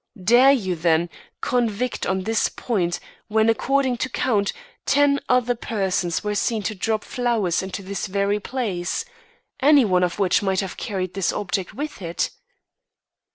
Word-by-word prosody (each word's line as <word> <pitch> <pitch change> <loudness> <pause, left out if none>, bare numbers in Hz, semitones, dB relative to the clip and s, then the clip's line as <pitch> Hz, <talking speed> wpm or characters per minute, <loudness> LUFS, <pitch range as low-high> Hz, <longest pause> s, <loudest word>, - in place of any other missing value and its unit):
Dare 245 +7 +6
you, 195 -10 0
then, 165 +1 +1 0.3
convict 245 0 -1
on 190 0 0
this 225 +2 +1
point 180 -8 -1 0.3
when, 220 0 +3
according 260 +2 +1
to 260 - -2
count, 215 -5 +1 0.3
ten 285 0 +3
other 250 -1 +3
persons 190 -7 -1
were 210 0 -1
seen 215 +1 0
to 220 - -2
drop 215 +2 -1
flowers 230 -8 0
into 190 +1 -6
this 195 0 -4
very 200 +2 0
place 210 - -3 0.5
any 285 -2 +6
one 180 -3 +2
of 175 -1 -1
which 195 -3 +2
might 190 -2 +1
have 190 -2 -5
carried 185 -5 -3
this 195 -2 0
object 190 -2 -3
with 295 -5 -5
it? 170 -1 -2
210 Hz, 155 wpm, -23 LUFS, 185-245 Hz, 0.5 s, Dare